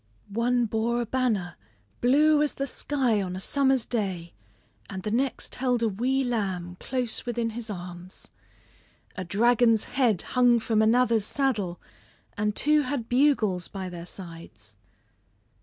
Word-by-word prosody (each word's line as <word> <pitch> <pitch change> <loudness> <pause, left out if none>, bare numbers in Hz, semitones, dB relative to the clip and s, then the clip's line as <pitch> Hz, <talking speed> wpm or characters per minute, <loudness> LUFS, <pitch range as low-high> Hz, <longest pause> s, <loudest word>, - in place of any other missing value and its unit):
One 240 +3 +1
bore 230 +2 0
a - - -2
banner 220 -8 -1 0.4
blue 295 +4 +4
as 300 - 0
the 275 - -2
sky 255 -5 0
on 185 -1 -4
a - - -4
summer's 265 +3 +2
day, 190 -7 -3 0.6
and 190 -1 -6
the 210 - -3
next 255 +3 -1
held 250 -2 0
a - - +3
wee 255 +7 0
lamb 190 -8 -2
close 250 -3 -2
within 235 -2 -2
his 225 0 -6
arms. 180 -1 -8 0.9
A 185 - -4
dragon's 225 +4 +3
head 235 -9 +1
hung 245 -1 +5
from 220 -1 +1
another's 230 -1 +3
saddle, 215 -12 -1 0.6
and 210 0 -1
two 300 +1 +3
had 255 -4 -3
bugles 245 -9 +2
by 190 -2 -6
their 175 -1 -8
sides. 165 - -10
230 Hz, 140 wpm, -26 LUFS, 190-250 Hz, 0.9 s, hung